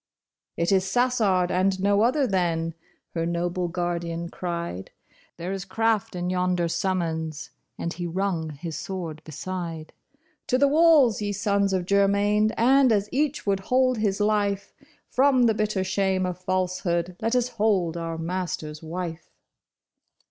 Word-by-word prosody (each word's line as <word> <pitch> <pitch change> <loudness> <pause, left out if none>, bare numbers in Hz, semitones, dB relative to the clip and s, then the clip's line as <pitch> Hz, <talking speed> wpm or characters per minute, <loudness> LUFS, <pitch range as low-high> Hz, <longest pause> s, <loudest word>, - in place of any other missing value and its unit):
" - - -66
It 170 +2 +1
is 190 -1 +4
Sassard 200 -4 +2
and 190 +1 +1
no 200 +1 +3
other, 265 +5 +3
then," 170 -6 0 0.4
her 165 - -1
noble 175 +1 -1
guard 175 0 -2
ian 170 0 -4
cried; 170 - -5 0.2
" - - -33
There 175 +2 -4
is 195 -1 -3
craft 220 +1 0
in 180 0 -2
yonder 180 -1 +1
summons," 165 -4 -2 0.3
and 170 - -3
he 175 0 -4
rung 175 -2 -1
his 155 +2 -6
sword 170 -5 -5
beside. 165 0 -6 0.3
" - - -42
To 255 - +2
the 280 +2 +4
walls, 295 -7 +5
ye 205 0 -1
sons 200 0 +1
of 185 -2 0
Germain! 200 +2 +3
and 260 +2 +5
as 205 -1 +1
each 295 +2 0
would 200 -1 +1
hold 255 -2 +3
his 205 -2 0
life 205 -1 0 0.3
From 265 -1 +3
the 230 -2 +4
bitter 215 -2 0
shame 190 0 0
of 180 -1 -4
falsehood, 180 -2 -1
let 230 +2 0
us 250 0 +2
hold 200 -7 +1
our 165 -1 -4
master's 165 -3 -4
wife." 165 0 -6
185 Hz, 155 wpm, -25 LUFS, 170-210 Hz, 0.4 s, walls